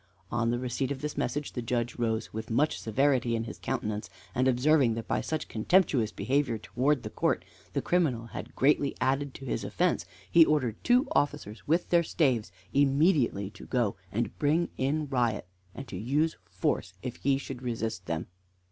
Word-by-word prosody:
On 115 -1 +1
the 120 - +1
receipt 125 +1 -2
of 135 -1 -4
this 150 0 -3
message 145 +4 -2
the 125 - -3
Judge 120 0 -1
rose 115 -2 -1
with 110 +1 -5
much 140 +7 +1
severity 125 0 +2
in 115 - -1
his 115 - -8
countenance, 105 -2 -3 0.2
and 130 +1 +2
observing 130 -1 +4
that 115 - -5
by - - 0
such 155 -1 -3
contemptuous 120 - +2
behavior 135 -3 0
towards 130 +5 0
the 110 - -6
court - - 0 0.3
the - - -1
criminal 145 -10 +1
had 115 - -8
greatly 140 0 +3
added 135 +2 0
to 135 - -8
his 125 - -2
offence, 85 +3 0 0.2
he 165 - +9
ordered 135 -8 0
two 250 +3 +4
officers 145 -7 -1
with 170 +4 +2
their 170 -1 +5
staves 130 - +1 0.2
immediately 140 - +3
to 100 - -12
go 120 -6 +1 0.2
and 115 0 -2
bring 155 +4 +2
in 150 +4 0
Riot, 120 -7 0 0.3
and 135 - -7
to 90 - -5
use 145 - +1
force 90 - -1
if 125 -2 -4
he 140 0 +2
should 135 -2 -7
resist 115 -7 -3
them. 80 0 -2
125 Hz, 180 wpm, -29 LUFS, 115-145 Hz, 0.3 s, he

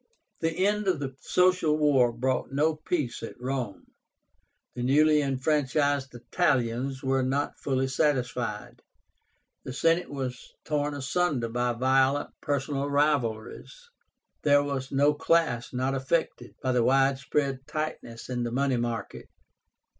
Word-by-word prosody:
The 165 +3 0
end 210 0 0
of 180 -5 +1
the 135 -2 -5
Social 180 -4 +2
War 140 -5 +4
brought 130 +3 -1
no 155 +3 +1
peace 150 -5 -3
at 115 - -8
Rome. 125 -4 -4 0.9
The 125 - -5
newly 150 +4 +4
enfranchised 140 0 0
Italians 130 -2 0
were 135 0 +1
not 135 +3 -1
fully 135 -1 0
satisfied. 125 -6 -1 0.8
The 130 - -6
Senate 165 +5 +1
was 130 -3 -6
torn 150 -1 -1
asunder 140 -3 0
by 120 +1 0
violent 130 +3 +2
personal 140 0 -1
rivalries. 140 -7 0 0.7
There 145 -1 +4
was 135 -2 -4
no 145 +2 +3
class 150 -6 +1
not 130 +1 -1
affected 135 +5 -2
by 130 - +1
the 125 -2 +2
wide 135 +1 +3
spread 135 -1 -2
tightness 155 -7 -5
in 125 -1 -3
the 120 - -1
money 135 +1 +1
market. 120 -1 -4
135 Hz, 130 wpm, -27 LUFS, 125-150 Hz, 0.9 s, War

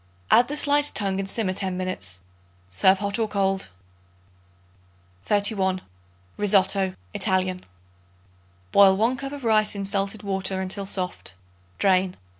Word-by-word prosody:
Add 245 +2 +6
the 295 - -4
sliced 290 0 +2
tongue 195 -2 0
and 195 0 -3
simmer 195 -3 -1
ten 185 -1 -2
minutes. 95 - -4 0.5
Serve 190 - +4
hot 200 +2 -2
or 225 - +1
cold. 195 - -1 1.6
31. 200 -2 +1 0.6
Rissotto 195 -2 +2 0.2
(ITALIAN). 185 -2 0 1.1
Boil 195 -1 +6
1 230 +5 +1
cup 275 +1 -6
of 285 -2 -8
rice 215 -2 +3
in 200 -1 -4
salted 200 +2 -1
water 190 -1 -1
until 190 +1 -3
soft; 180 - -3 0.4
drain. 185 -1 +1
195 Hz, 125 wpm, -24 LUFS, 190-210 Hz, 1.6 s, Add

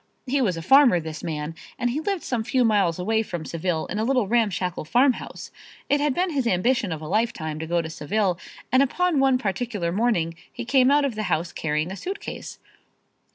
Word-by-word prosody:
He 275 +1 +1
was 185 -9 +1
a 165 - -5
farmer, 265 - +6
this 160 -1 -7
man, 155 -2 -3 0.2
and 245 0 0
he 280 - -1
lived 380 +2 -2
some 240 -3 -1
few 250 +2 +2
miles 200 -7 +2
away 220 +5 +1
from 175 -7 -5
Seville 165 -1 -2
in 205 - -4
a - - +1
little 250 -3 +1
ramshackle 190 -7 0
farm 250 - +4
house. - - -9 0.4
It 285 0 +3
had 290 -3 +1
been 360 0 0
his 270 -5 0
ambition 225 +1 +1
of 160 -1 -4
a - - -6
lifetime 170 -6 -1
to 160 - -5
go 170 0 +1
to - - -5
Seville 180 +4 -1 0.3
and 260 - +5
upon 335 +3 +1
one 270 -1 +4
particular 205 -4 -2
morning 190 -5 +1 0.2
he 240 - -6
came 260 +1 +4
out 290 0 +4
of 270 - -1
the 215 - -4
house 165 +1 0
carrying 155 +2 -2
a - - -5
suitcase. 385 - -6
215 Hz, 210 wpm, -24 LUFS, 170-260 Hz, 0.4 s, farmer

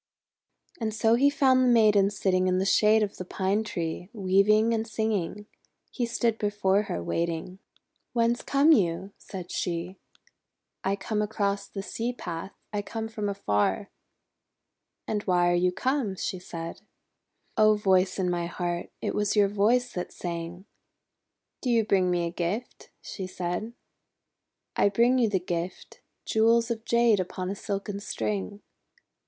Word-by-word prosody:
And 220 -2 -2
so 225 +1 +3
he 270 +4 +5
found 260 -2 +4
the - - +3
Maiden 210 -4 +5
sitting 185 -2 +1
in 185 0 +2
the 190 - +1
shade 215 +2 +4
of 205 - -4
the - - -4
Pine 190 +4 0
Tree, 175 -3 -4
weaving 215 +2 +3
and 225 0 -1
singing. 210 -3 -2 0.5
He 240 -2 -2
stood 230 -1 0
before 205 -1 +2
her, 85 - -2
waiting. 170 - -2 0.5
'Whence 235 0 +2
come 280 +3 +4
you?" 190 - +2
said 180 -3 -8
she. 175 +2 -3 0.9
:<I 195 - +1
am - - -2
come 210 0 -2
across 200 -1 -1
the 195 - -6
sea 230 +4 -3
path. 175 -4 -6 0.2
I - - -1
am 205 - -1
come 225 -1 -4
from 210 -2 -3
afar." 105 - 0 1.1
"And 210 -1 -1
why 175 -2 +3
are - - +2
you 180 +1 +2
come?" 255 -1 -1
she 185 0 -3
said. 170 -1 -7 0.7
:'O 215 -1 +5
Voice 190 -2 +2
in 190 -2 0
my 175 -1 -1
heart, 175 0 -3
it - - -1
was 210 0 0
your 205 -1 +4
voice 230 +5 +2
that 180 - -4
sang!' 170 +1 -6 1.0
'Do 255 - -2
you 230 -2 +3
bring 190 -3 +2
me 175 -1 +1
a 170 - -3
gift?" 185 +7 -4
she 190 -2 -6
said. 180 +5 -4 1.0
"I - - +4
bring 235 +5 +3
you 230 -3 +3
the 195 -2 +1
gift, 175 -1 -5 0.2
jewels 230 +1 +3
of 225 0 -4
Jade 235 -3 +4
upon 185 0 -3
a - - -3
silken 200 0 -4
string." 105 - -3
200 Hz, 160 wpm, -27 LUFS, 180-220 Hz, 1.1 s, he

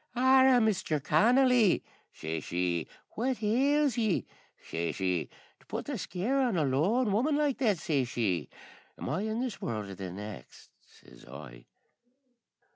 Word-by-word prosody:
"Arrah, 260 0 +5
Mister 205 -9 0
Connolly," 235 - +4 0.3
shashee, 85 +2 -3 0.2
"what 245 0 -2
ails 270 +4 +2
ye?" 215 -6 0 0.3
shashee, 85 +1 -2 0.3
"to - - -25
put - - -4
the - - -4
scare 205 +10 -1
on 245 -8 +1
a 155 - +2
lone 195 - +1
woman 260 +9 +1
like 295 -3 0
that?" 215 -8 +2
shashee. 120 - -1 0.5
"Am - - -6
I 190 - -1
in 220 +2 -2
this 255 -5 -4
world 105 -4 -4
or - - -6
the 95 -1 -6
next?" 100 - -10 0.2
sez - - -18
I. 65 -4 -11
195 Hz, 135 wpm, -30 LUFS, -, 0.5 s, Arrah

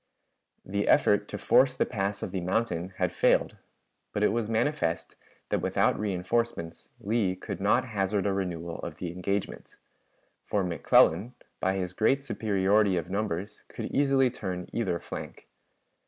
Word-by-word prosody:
The 100 +2 -1
effort 105 0 +4
to 105 - -5
force 130 +4 +4
the - - +2
pass 100 -3 -2
of - - -4
the 95 -1 -2
mountain 95 -1 -1
had - - 0
failed, - - +2 0.6
but 105 - 0
it - - +5
was 115 -2 -1
manifest 110 - -1 0.3
that - - 0
without - - +2
reënforcements 95 -3 -2
Lee 100 -3 0
could 95 - -6
not 110 +6 +3
hazard 100 -1 0
a 100 - +1
renewal 85 -3 -3
of - - -6
the 90 -2 -4
engagement; 95 +3 -4 0.7
for 100 -2 0
McClellan, 90 - +3 0.2
by 95 +1 +1
his 90 -2 -3
great 135 +8 +2
superiority 100 -4 +2
of 85 +1 -4
numbers, 100 -1 -3
could - - -6
easily 135 -2 +3
turn 90 -6 -5
either 95 -7 -1
flank. - - -8
100 Hz, 150 wpm, -28 LUFS, 90-110 Hz, 0.7 s, it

